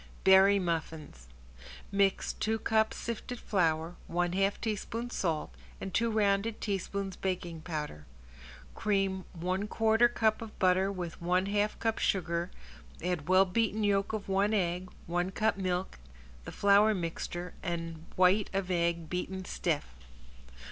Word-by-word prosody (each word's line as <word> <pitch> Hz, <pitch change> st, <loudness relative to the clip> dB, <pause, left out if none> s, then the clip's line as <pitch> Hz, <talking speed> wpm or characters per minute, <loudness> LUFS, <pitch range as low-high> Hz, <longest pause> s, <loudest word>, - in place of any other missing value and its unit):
~BERRY 190 Hz, +1 st, +7 dB
MUFFINS~ 160 Hz, -, -4 dB, 0.6 s
Mix 195 Hz, -1 st, +2 dB
two 220 Hz, +1 st, -1 dB
cups 220 Hz, 0 st, +1 dB
sifted 235 Hz, +1 st, -5 dB
flour, 165 Hz, -3 st, 0 dB
one 175 Hz, 0 st, 0 dB
half 195 Hz, +1 st, +1 dB
teaspoon 230 Hz, +2 st, -3 dB
salt 165 Hz, -9 st, -2 dB, 0.3 s
and 190 Hz, -, -6 dB
two 230 Hz, 0 st, +2 dB
rounded 215 Hz, 0 st, +1 dB
teaspoons 195 Hz, -1 st, -3 dB
baking 175 Hz, -3 st, -3 dB
powder. 150 Hz, -, -5 dB, 0.7 s
Cream 195 Hz, -3 st, 0 dB
one 185 Hz, +4 st, -2 dB
quarter 225 Hz, +2 st, +4 dB
cup 220 Hz, -2 st, +1 dB
of 225 Hz, -2 st, -9 dB
butter 185 Hz, +1 st, +3 dB
with 175 Hz, -4 st, -6 dB
one 180 Hz, +2 st, +2 dB
half 205 Hz, +1 st, 0 dB
cup 225 Hz, -1 st, -1 dB
sugar, 170 Hz, -2 st, 0 dB, 0.5 s
add 175 Hz, -3 st, -2 dB
well 185 Hz, +1 st, +6 dB
beaten 215 Hz, +2 st, 0 dB
yolk 200 Hz, -1 st, +2 dB
of 215 Hz, -2 st, -4 dB
one 200 Hz, +2 st, +2 dB
egg, 180 Hz, -1 st, -1 dB, 0.2 s
one 175 Hz, +2 st, -1 dB
cup 215 Hz, +3 st, +1 dB
milk, 185 Hz, -, -2 dB, 0.5 s
the -, -, -6 dB
flour 205 Hz, +2 st, +4 dB
mixture 175 Hz, 0 st, -4 dB
and 165 Hz, -2 st, -4 dB
white 185 Hz, +3 st, +4 dB
of 190 Hz, -1 st, -1 dB
egg 170 Hz, -2 st, 0 dB
beaten 185 Hz, +2 st, -4 dB
stiff. -, -, -1 dB
190 Hz, 135 wpm, -31 LUFS, 175-205 Hz, 0.7 s, ~BERRY